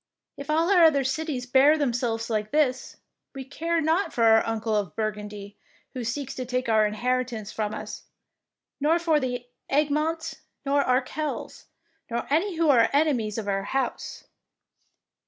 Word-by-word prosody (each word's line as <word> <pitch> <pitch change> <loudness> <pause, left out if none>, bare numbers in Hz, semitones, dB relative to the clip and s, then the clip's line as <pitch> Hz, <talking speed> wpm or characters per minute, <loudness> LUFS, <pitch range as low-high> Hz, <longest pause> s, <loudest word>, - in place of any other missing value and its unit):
If 280 0 -9
all 325 +4 +2
our 360 -4 +6
other 295 -4 +5
cities 265 -1 -2
bear 270 +5 +5
themselves 240 -5 -1
like 215 -2 -2
this, 290 -3 0 0.4
we 265 -1 -6
care 330 +5 -1
not 320 +5 +1
for 235 - 0
our 225 0 +6
uncle 225 -1 -1
of 200 -7 -2
Burgundy, 210 -2 -5 0.3
who 255 - -4
seeks 260 +4 -3
to 255 - -4
take 255 0 -2
our 215 -1 +4
in 210 - -5
heritance 245 -3 -2
from 215 -1 -3
us, - - -8 0.7
nor 305 +4 +3
for 330 -3 +2
the 245 -2 -3 0.2
Egmonts 305 +3 0 0.3
nor 280 +1 +2
Arkels, 265 +4 -2 0.4
nor 235 0 -2
any 345 +5 +1
who 330 0 +1
are 230 -4 +4
enemies 270 -8 +1
of 215 -2 -4
our 195 0 -1
house." 265 +1 -3
255 Hz, 155 wpm, -26 LUFS, 225-300 Hz, 0.7 s, our